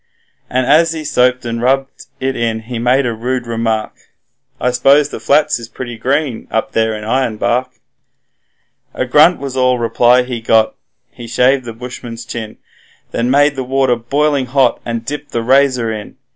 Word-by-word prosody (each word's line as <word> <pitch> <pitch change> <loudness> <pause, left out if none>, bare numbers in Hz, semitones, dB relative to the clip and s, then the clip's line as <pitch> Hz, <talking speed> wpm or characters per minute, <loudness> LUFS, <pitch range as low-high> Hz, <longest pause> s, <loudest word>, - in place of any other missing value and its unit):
And 130 0 0
as 160 +4 +4
he 160 -1 -5
soaped 125 -4 +1
and 115 0 -3
rubbed 135 +2 -1
it 130 0 -2
in 115 -1 -1
he 115 +1 -6
made 125 +3 +2
a 120 - -1
rude 125 +2 -3
remark: 115 -2 -2 0.7
'I 125 - +1
s'pose 135 +4 +4
the - - -7
flats 145 -3 +2
is 115 -1 -10
pretty 120 -2 -7
green 130 +1 -2
up 110 - -1
there 110 -1 0
in 105 - -7
Ironbark.' 120 +1 0 1.3
A - - -1
grunt 150 +7 +5
was 135 -2 -5
all 130 -1 +2
reply 120 +1 +3
he 125 -2 -5
got; 110 -1 +3 0.4
he 120 - -10
shaved 125 +2 +2
the 115 - -6
bushman's 120 0 -8
chin, 110 -3 -7 0.5
Then 120 +1 -1
made 145 +2 +3
the 130 - -3
water 130 -1 +1
boiling 140 +3 0
hot 130 -1 +2
and 115 -1 -4
dipped 145 +2 -6
the 115 - -1
razor 130 -3 +2
in. 105 -1 -8
125 Hz, 170 wpm, -16 LUFS, 115-135 Hz, 1.3 s, grunt